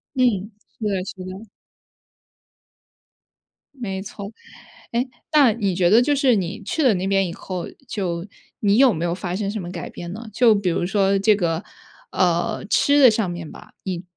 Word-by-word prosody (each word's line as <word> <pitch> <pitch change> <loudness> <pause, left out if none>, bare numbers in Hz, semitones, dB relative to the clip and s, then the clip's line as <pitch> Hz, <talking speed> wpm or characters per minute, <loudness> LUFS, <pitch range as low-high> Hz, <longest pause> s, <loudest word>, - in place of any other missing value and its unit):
嗯， 230 -5 +1 0.3
是 - - -7
的， 195 -3 0
是 - - -7
的。 185 +2 -7 2.3
没 195 -7 -4
错。 200 +1 -8 0.6
哎， 240 +3 +1 0.3
那 275 -7 +6
你 200 -5 -1
觉 175 -1 +3
得 220 +5 +6
就 290 +3 +2
是 265 -4 +3
你 190 +2 -3
去 305 +9 -1
了 245 -5 +5
那 185 +2 -2
边 195 -1 +2
以 170 - -6
后， 185 -2 -5 0.2
就 180 -4 -3 0.3
你 205 0 +3
有 260 -4 +6
没 165 +1 -2
有 170 - -1
发 180 -1 -4
生 200 0 -2
什 210 -1 -3
么 175 - -6
改 175 - -6
变 175 0 -8
呢？ 225 +3 -8
就 230 0 +5
比 200 -3 0
如 175 - 0
说 195 0 +2
这 210 +1 +4
个， 170 -4 -1 0.5
呃， 175 +2 0
吃 285 +1 +4
的 255 - +9
上 215 -4 0
面 170 -2 -6
吧， - - -13
你 180 -2 -4
195 Hz, 195 characters per minute, -22 LUFS, 180-225 Hz, 2.3 s, 的